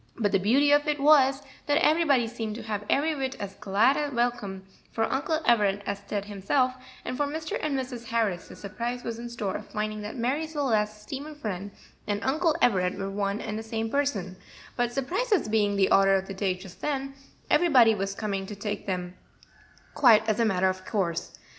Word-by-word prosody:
But 205 -3 +1
the 195 - +3
beauty 265 +9 +3
of 290 +1 +4
it 300 -1 0
was, 275 -1 +5 0.2
that 290 0 +3
everybody 305 -7 +3
seemed 225 -2 -5
to 235 - -7
have 210 -2 -3
every 310 +3 +2
whit 265 -2 -3
as 200 -1 -5
glad 210 +8 +2
a 295 -1 -1
welcome 235 -6 -2 0.3
for 225 - 0
Uncle 295 +7 0
Everett 205 -3 +3
as 200 0 -3
Ted 200 0 -4
himself; 210 +6 0 0.3
and - - -3
for 290 +2 0
Mr. 310 +2 -4
and 295 -3 -1
Mrs. 250 -2 -5
Harris 220 -7 -1
the - - -11
surprise 235 +5 -5
was 230 -1 -4
in 240 0 -6
store 215 -5 -3
of - - -11
finding 215 0 -3
that 210 +5 -6
Marie 265 +7 0
Celeste's 215 -9 -1
steamer 285 +6 -7
friend 205 -8 -5 0.4
and 205 0 -1
Uncle 310 +4 +1
Everett 185 -5 +2
were 195 0 -4
one 200 +1 -1
and 210 +1 -4
the - - -4
same 225 0 -3
person; 210 -11 -1 0.4
but 240 -1 0
surprises 370 - 0
being 210 -2 +2
the 195 -1 +2
order 195 0 +5
of 190 0 0
the 195 - -6
day 190 -1 0
just 185 0 -13
then, 275 -2 -2 0.4
everybody 255 -10 +6
was 195 -1 -3
coming 195 -3 -3
to 210 - -7
take 205 0 -5
them 180 -2 -3 0.8
quite 225 -5 +5
as 215 +1 +1
a 230 - +4
matter 190 -3 +2
of 185 0 -2
course. 180 -6 -2
225 Hz, 200 wpm, -27 LUFS, 200-275 Hz, 0.8 s, everybody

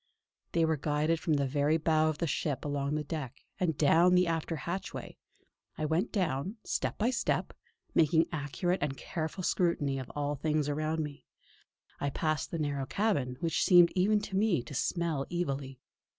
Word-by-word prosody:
They 165 -1 +3
were 160 -1 +1
guided 150 +3 0
from 160 - 0
the 140 -1 +1
very 145 +3 +2
bow 155 0 +2
of 155 - -2
the 170 - -1
ship 145 -2 -2
along 145 0 -1
the 155 - -1
deck, 145 -4 -6 0.2
and 160 -5 0
down 170 +4 +5
the 180 0 +5
after 165 0 -1
hatchway. 175 +4 -5 0.6
I 155 - -1
went 160 +8 0
down, 180 - -1
step - - -2
by 230 +4 +2
step, 250 - -1 0.4
making 160 0 +4
accurate 165 +4 -1
and 140 -2 -1
careful 160 +3 -4
scrutiny 150 -7 +1
of 130 - -7
all 145 0 -1
things 150 +1 0
around 155 +2 -1
me. 145 -1 -9 0.7
I 140 - 0
passed 155 +2 -1
into 165 -2 -1
the - - 0
narrow 140 -2 -3
cabin, 145 - 0
which 165 -2 +1
seemed 175 -2 +7
even 205 +3 +3
to 200 -2 -5
me 195 - +2
to 125 - -10
smell 160 0 -1
evilly. 140 -6 -3
155 Hz, 180 wpm, -31 LUFS, 145-170 Hz, 0.7 s, seemed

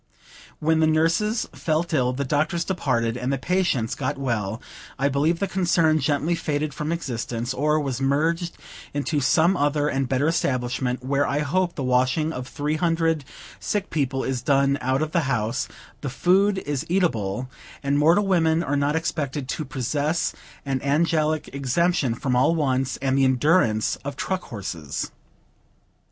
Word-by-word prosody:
When 160 +1 +2
the 160 - +4
nurses 165 +8 +1
felt 160 +1 -1
ill, 125 -4 +2
the 140 +2 -3
doctors 155 +5 0
departed, 125 -11 0
and 125 +2 -2
the 135 - +1
patients 140 -7 0
got 140 +1 -2
well, 115 -6 -2 0.4
I 140 +1 +1
believe 150 +5 +1
the 200 - -1
concern 170 -4 +2
gently 145 +3 +1
faded 150 -3 -2
from 150 +3 -3
existence, 120 -6 -3
or 150 +3 +1
was 135 -3 -3
merged 165 +5 0 0.4
into 145 +1 0
some 160 +7 +3
other 145 -1 +1
and 135 -3 -1
better 135 +3 +1
establishment, 125 -5 -1
where 140 +1 +1
I 145 +1 0
hope 175 +4 0
the 140 - -3
washing 130 +5 +1
of 125 -2 -5
three 150 +1 -2
hundred 165 -3 +1 0.3
sick 205 -1 -2
people 135 -3 0
is 130 -2 -2
done 140 +1 +2
out 130 +3 +1
of 155 - -3
the 170 - +2
house, 120 +1 -1 0.3
the 145 - -3
food 190 +8 +3
is 145 -7 -2
eatable, 130 - 0 0.4
and 140 0 +1
mortal 170 +7 +4
women 165 -3 +2
are 145 - -1
not 145 +1 +1
expected 145 -4 -2
to 155 - -3
possess 145 +4 -1 0.3
an 135 -1 -1
angelic 155 +2 +1
exemption 140 -1 +1
from 125 +1 -1
all 130 +7 +3
wants, 135 -4 0
and 135 -1 +2
the - - +4
endurance 130 - +2
of 140 0 -6
truck 185 +5 -3
horses. 85 - -5
145 Hz, 160 wpm, -24 LUFS, 130-165 Hz, 0.4 s, the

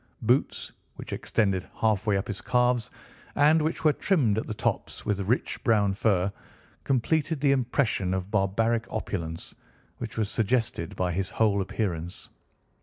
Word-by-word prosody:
Boots 125 +5 +1 0.2
which - - -7
extended 95 -4 0
halfway 105 -2 +2
up 95 - -3
his 105 - -4
calves, 125 -1 +1 0.5
and 150 +3 +5
which 155 +2 -2
were 155 -2 +5
trimmed 140 - +2
at - - -5
the - - -3
tops - - -2
with 105 -2 0
rich 110 +7 -1
brown 105 -4 +3
fur, 100 -2 +1 0.5
completed 155 +4 +1
the 140 0 +3
impression 125 -7 +1
of 95 +1 -3
barbaric 110 +3 +1
opulence 85 -6 -4 0.5
which - - -6
was 110 -2 +1
suggested 110 -6 -1
by 90 -1 0
his 95 +2 -2
whole 105 -3 +2
appearance. 90 -3 -4
110 Hz, 145 wpm, -27 LUFS, 95-125 Hz, 0.5 s, and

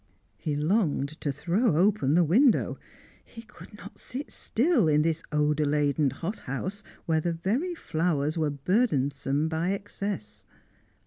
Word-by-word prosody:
He 150 - -2
longed 155 -3 0
to 145 - -1
throw 170 - +1
open 175 -6 +3
the 175 - +5
window; 225 - +3 0.4
he 230 - -12
could 230 -2 -14
not - - -12
sit 270 +4 -7
still 245 - +1
in 150 0 +3
this 165 0 0
odour 150 0 +1
laden 145 0 +2
hothouse, 185 - -5 0.2
where 160 -1 +1
the 170 +1 -1
very 235 - -1
flowers 155 - -1
were 155 -3 0
burdensome 145 - 0
by 165 +4 -1
excess. 200 - -5
165 Hz, 135 wpm, -27 LUFS, 150-205 Hz, 0.4 s, the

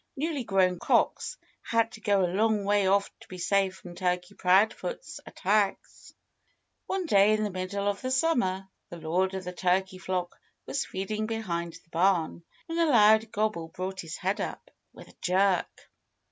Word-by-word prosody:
Newly 295 -2 -2
grown 185 -4 +2
cocks - - +1 0.2
had 230 0 +1
to 225 - -12
go 200 -3 +2
a 175 - -3
long 215 +1 +2
way 205 -1 +2
off 200 +1 +2
to - - -16
be 185 - -9
safe 190 +1 +1
from 175 -2 -11
Turkey 180 +1 -2
Proudfoot's 210 - +1
attacks. 200 +1 -1 0.7
One 380 -1 -2
day 205 -6 +5
in 215 0 +1
the 210 - -2
middle 185 +2 -3
of 200 0 -1
the 255 - -3
summer 245 - +1 0.2
the 175 - -8
lord 180 +4 0
of 190 - -4
the 180 0 -6
turkey 185 +1 0
flock 180 0 -3 0.3
was 275 - -2
feeding 215 +3 -3
behind 175 -7 -3
the - - -16
barn 170 -1 +1 0.2
when 330 0 -3
a 335 - +4
loud 220 -4 +5
gobble 210 -6 -1
brought 185 +2 -5
his 165 -1 -7
head 190 +3 -1
up - - -6 0.2
with - - -14
a - - -19
jerk. 185 +1 0
195 Hz, 175 wpm, -28 LUFS, 185-215 Hz, 0.7 s, day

